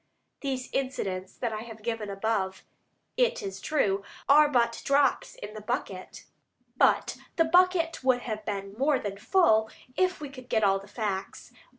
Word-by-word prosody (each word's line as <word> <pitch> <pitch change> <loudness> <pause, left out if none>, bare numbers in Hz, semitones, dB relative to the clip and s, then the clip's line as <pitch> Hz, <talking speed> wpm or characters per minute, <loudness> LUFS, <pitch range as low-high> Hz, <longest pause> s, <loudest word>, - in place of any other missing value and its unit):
These 265 -3 -3
incidents 195 -9 -3
I 220 -3 -1
have 225 -2 -10
given 225 -2 -3
above, 195 -1 -1 0.5
it - - +2
is 390 - -6
true, 205 -11 +1 0.3
are 295 +2 +7
but 235 -4 +1
drops 280 -1 +2
in 205 +1 -8
the 215 - -8
bucket, 205 -4 -5 0.5
but - - +3 0.2
the 330 - +4
bucket 340 -2 +3
would 255 -1 +2
be 215 -3 -3 0.2
more 280 +1 +3
than 200 -3 -5
full 220 - +3 0.3
if 370 0 +1
we 295 -2 -6
could 255 -2 -12
get 220 -1 +2
all 195 -1 +4
the 195 - -13
facts. 200 -2 -4
235 Hz, 155 wpm, -28 LUFS, 205-290 Hz, 0.5 s, are